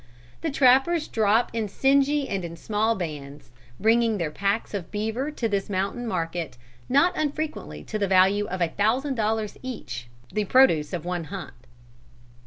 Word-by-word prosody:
The 330 - -1
trappers 275 +4 +4
drop 220 +1 +2
in 225 -2 -1
singly 275 +5 +2
and 195 -2 -2
in 170 -1 -6
small 220 +4 0
bands, 150 - -7 0.3
bringing 225 0 +3
their 165 -5 -2
packs 200 +7 -1
of 195 -5 -4
beaver 220 +7 -2
to 255 -6 -2
this 200 -2 -2
mountain 200 +5 -2
market, 165 - -3 0.3
not 340 +8 +4
unfrequently 295 - -3
to 215 - -4
the 200 - +1
value 195 +2 +4
of 185 0 -4
a 170 - +2
thousand 245 - +1
dollars 220 -2 -1
each, 125 - -6 0.3
the 210 -1 0
produce 190 - +4
of 175 -2 -4
one 175 -2 -2
hunt. 190 +3 -7
210 Hz, 160 wpm, -25 LUFS, 180-255 Hz, 0.3 s, trappers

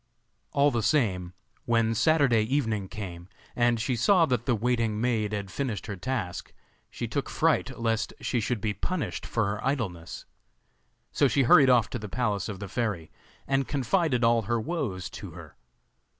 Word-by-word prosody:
All 145 +1 +3
the 120 -2 0
same, 95 - +1 0.3
when 115 -1 +2
Saturday 125 -1 +3
evening 110 -5 -1
came, 90 -4 -8 0.3
and 120 -1 +2
she 125 +3 0
saw 170 - +4
that 125 -5 -1
the 125 - +3
waiting 115 -1 0
maid 110 -3 0
had 100 -3 -4
finished 125 -5 -3
her 100 - -5
task, 95 -3 -4 0.4
she - - -5
took - - -3
fright - - +1
lest 115 -1 0
she 125 - -1
should 115 0 -2
be 105 -1 -1
punished 160 - -3
for 110 -2 0
her 100 +2 -3
idleness. 110 - -3 0.9
So 140 - +3
she 135 +1 +2
hurried 135 +2 +6
off 120 -4 +5
to 125 - -3
the 105 -1 -7
palace 105 -3 -1
of 100 -3 -6
the 100 - -6
fairy, 100 -6 -3 0.3
and 135 -1 0
confided 140 -1 +1
all 115 0 +4
her 115 +2 -1
woes 115 - -3
to - - -8
her. - - -12
115 Hz, 170 wpm, -27 LUFS, 105-130 Hz, 0.9 s, hurried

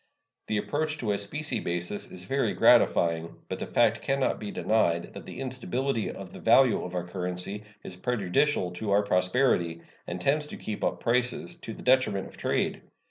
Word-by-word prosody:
The 110 - 0
approach 145 +9 -1
to 115 -7 -1
a 100 - +1
specie 150 +10 -3
basis 90 +3 -2
is 90 - -6
very 135 +8 0
gratifying, 85 -1 +4
but - - -3
the - - -4
fact 115 -1 +3
can 135 0 0
not 130 - +1
be 105 - -5
denied 85 -6 +1
that - - -9
the - - -8
instability 130 -1 -2
of 95 -2 -8
the - - -9
value 120 +2 +5
of 90 0 -6
our 90 -1 -2
currency 90 +3 -4 0.2
is 90 - -6
prejudicial 100 0 +1
to 95 +4 -5
our 100 +1 +4
prosperity, 90 -3 +1 0.2
and 85 - -4
tends 150 +8 +1
to - - -8
keep 110 - -5
up - - -1
prices, 125 +7 0
to 115 -10 -8
the - - -11
detriment 125 -7 +3
of - - -12
trade. - - -1
105 Hz, 190 wpm, -28 LUFS, 90-130 Hz, 0.2 s, value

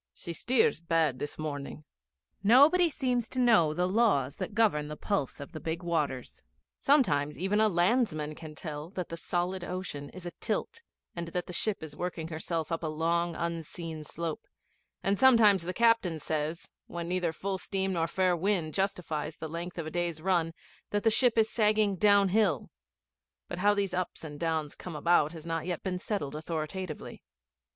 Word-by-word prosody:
She 170 - -6
steers 240 0 +2
bad 165 -5 +1
this 145 - -4
morning.' 150 -1 -5 0.6
Nobody 285 - +6
seems 250 -5 -1
to 255 - -3
know 220 -11 +5
the 175 +3 0
laws 185 - +2
that 205 - -5
govern 200 -10 +3
the 150 0 -6
pulse 175 -9 -2
of 140 - -8
the 155 - -7
big 165 +2 -3
waters. 150 -7 -2 0.4
Sometimes 150 - +3
even 195 +4 +1
a 220 - +5
landsman 175 -5 +1
can 155 0 -10
tell 150 0 -6
that 185 -2 -5
the 165 - -4
solid 175 +2 -2
ocean 175 -6 -5
is 185 -1 -11
atilt, 175 - -3 0.3
and 170 -1 -4
that 175 +1 -3
the 180 - -8
ship 205 0 -1
is 150 -2 -7
working 165 -1 -4
herself 160 0 -3
up 165 - -1
a 165 - -2
long 165 +2 0
unseen 165 -1 -4
slope; 165 +1 -5 0.6
and 195 0 +1
sometimes 225 -7 +6
the 175 +2 -3
captain 230 -7 +3
says, 155 +2 -3 0.2
when 170 -1 -5
neither 180 -1 0
full 190 +3 -3
steam 190 0 -1
nor 165 -2 +1
fair 185 +1 +2
wind 175 -3 0
justifies 165 -6 -2
the 160 - -5
length 170 +3 -6
of 165 - -3
a 155 - -5
day's 175 -2 -1
run, 170 -1 +1 0.4
that 205 0 -1
the 225 - +4
ship 240 +1 +3
is 220 -1 +5
sagging 215 -2 +2
downhill; 200 - +3 0.8
but 175 - -5
how 205 +2 +4
these 200 -3 -1
ups 185 -2 -3
and 145 -2 -7
downs 160 -3 -1
come 180 -3 -8
about 155 0 +3
has 160 -1 -9
not 165 0 -2
yet 175 -3 -3
been 185 -2 -2
settled 180 -9 -3
authoritatively. 160 +2 -5
175 Hz, 175 wpm, -30 LUFS, 155-200 Hz, 0.8 s, Nobody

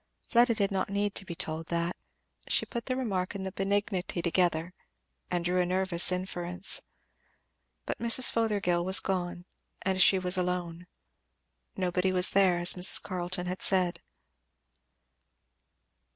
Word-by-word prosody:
Fleda 235 0 +2
did 200 -2 -1
not 195 0 -2
need 200 0 -2
to 195 - 0
be 170 -3 -7
told 165 -2 -4
that; 170 +1 -2 0.5
she - - +1
put 235 -1 -7
the 255 - -1
remark 200 -8 -3
and 190 -1 -5
the 190 - -4
benignity 195 -2 -2
together, 170 -1 0 0.6
and 175 -1 -3
drew 180 +1 +1
a - - 0
nervous 185 -2 +2
inference. 180 0 -2 1.0
But - - -5
Mrs. 235 +2 +4
Fothergill 200 -6 0
was 190 +2 +3
gone 175 -2 -4 0.4
and 190 0 0
she 190 - +6
was 185 0 -2
alone. 180 -1 -4 0.9
Nobody 185 0 -1
was 185 0 +6
there, 190 -3 +3
as 175 0 +7
Mrs. 180 0 +5
Carleton 180 -1 -4
had 180 +1 -5
said. 185 -2 +2
185 Hz, 140 wpm, -28 LUFS, 175-195 Hz, 1.0 s, as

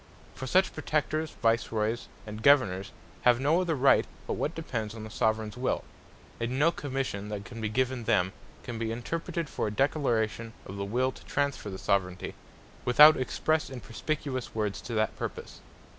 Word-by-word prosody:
For 130 - -6
such 185 +7 +3
Protectors, 155 0 -1
Vice 115 0 +2
Roys, 110 +1 -1 0.2
and 105 0 -7
Governours, 110 -8 +4 0.3
have 120 -1 +5
no 155 +6 +3
other 170 -3 0
right, 135 0 +4 0.2
but - - -2
what 155 - -2
depends 115 -9 -4
on 110 - -7
the 110 - -8
Soveraigns 110 0 0
Will; 125 - 0 0.6
and 120 +2 -1
no 155 +4 +5
Commission 130 -10 -3
that 105 -1 -5
can 115 -2 -8
be 110 - -1
given 130 +1 0
them, 95 -5 +2 0.3
can 120 -2 -5
be 115 -1 -1
interpreted 165 +7 -3
for - - -2
a - - -2
Declaration 115 -4 0
of 95 - -7
the 100 - -2
will 125 +6 +1
to - - -14
transferre 140 -7 -1
the 95 - -5
Soveraignty, 95 -2 -1 0.5
without 150 +5 +8
expresse 155 +4 0
and 130 -3 -8
perspicuous 135 0 -3
words 105 -2 -1
to 120 - -5
that 110 -1 +1
purpose. - - -6
120 Hz, 175 wpm, -29 LUFS, 110-140 Hz, 0.6 s, without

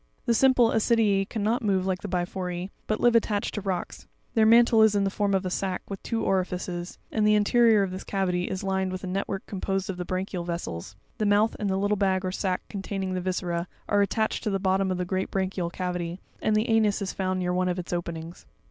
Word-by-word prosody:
28. - - -43
The 235 - +3
simple 250 -1 +4
Ascrprm 210 -3 +2
cannot 220 +2 0
move 195 -4 +1
like 185 -1 -1
the - - -5
Biphore, 180 0 -3 0.2
but 215 - 0
live 240 -1 +4
attached 210 -3 +1
to 210 - -3
rocks; 185 -3 -4 0.3
their 220 -2 +4
mantle 230 0 +6
is 220 -1 +5
in 200 - +2
the 195 - 0
form 200 -1 +1
of 190 0 0
a 185 - -2
sack, 190 0 -2
with 195 -1 -6
two 225 -1 -2
orifices, 180 -2 -2
and 215 - +1
the 210 - +5
interior 220 0 +4
of 190 - -2
this 185 - -6
cavity 180 -3 -1
is 190 +1 -4
lined 190 -1 0
with 185 +1 -5
a - - -3
net 190 +2 -2
work 195 -1 -4
composed 195 -1 -2
of 180 - -8
the 180 - -3
branchial 185 0 -3
vessels; 100 - -5 0.2
the 215 - +1
mouth 205 +2 +3
and 205 -2 -1
the 190 - +1
little 205 +1 +1
bag 190 -1 +1
or 185 - -1
sack 185 -1 -1
containing 195 -2 -4
the 185 - -2
viscera, 180 -1 -2 0.2
are 205 -1 +3
attached 220 +2 0
to - - 0
the 195 - +1
bot 190 0 +1
tom 195 -1 +1
of 185 - -1
the 180 - -2
great 190 +1 -2
branchial 190 -2 -1
cavity, 180 -1 -3 0.2
and 215 - +2
the 215 +3 +2
anus 215 -3 +2
is 190 - -3
found 185 -1 -1
near 180 -1 0
one 180 0 +1
of 180 - -1
its 180 -1 -5
openings. 170 -1 -5
195 Hz, 240 wpm, -26 LUFS, 180-210 Hz, 0.3 s, mantle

